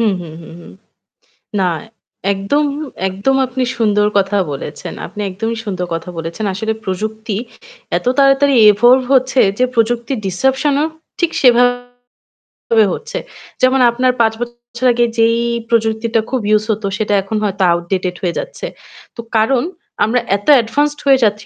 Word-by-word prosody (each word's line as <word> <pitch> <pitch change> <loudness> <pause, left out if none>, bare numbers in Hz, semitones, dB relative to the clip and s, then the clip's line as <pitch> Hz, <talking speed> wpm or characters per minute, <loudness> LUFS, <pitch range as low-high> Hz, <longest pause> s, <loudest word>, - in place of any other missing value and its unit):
হুম, 220 -3 +2
হুম, 165 -3 -9
হুম, 165 - -12
হুম। - - -13 0.9
না, 185 - +2 0.6
একদম 200 +10 0 0.4
একদম 200 +8 0
আপনি 255 +1 -3
সুন্দর 210 -2 +2
কথা 195 +1 0 0.2
বলেছেন। 140 +2 -7
আপনি 210 - -9
একদমই 225 +5 -3
সুন্দর 185 -3 -3
কথা 165 +2 -5
বলেছেন। 165 +6 -5
আসলে 220 +4 -2
প্রযুক্তি 215 +2 -3 0.6
এত - - -4
তাড়াতাড়ি 275 0 +4 0.2
evolve 245 +5 +4
হচ্ছে 260 0 +3 0.2
যে 250 - +3
প্রযুক্তির 235 +2 0
ডিজরাপশন 265 - +1
-ও 305 - +2 0.3
ঠিক 345 - +2
সেভাবে 245 0 +2 0.8
হচ্ছে। 470 +2 -6 0.4
যেমন, 255 +1 +4
আপনার 255 +2 +2
৫ 220 -1 +3
বছর 240 +1 -6
আগে 240 0 +2
যেই 230 0 +3 0.3
প্রযুক্তিটা 225 0 +1
খুব 260 -1 -1
ইউজ 215 0 +3
হতো, 210 -1 -2
সেটা 210 -1 -1
এখন 195 +3 -3
হয়তো 195 -2 -1
outdated 180 +1 -2
হয়ে 175 -2 -1
যাচ্ছে। - - -6 0.5
তো 235 - -6
কারণ 235 +3 +3 0.4
আমরা 230 +4 +2 0.2
এত 205 - -17
অ্যাডভান্সড 290 +5 +1
হয়ে 270 -1 +5
যাচ্ছি 210 -1 +1
225 Hz, 145 wpm, -16 LUFS, 200-255 Hz, 0.9 s, হয়ে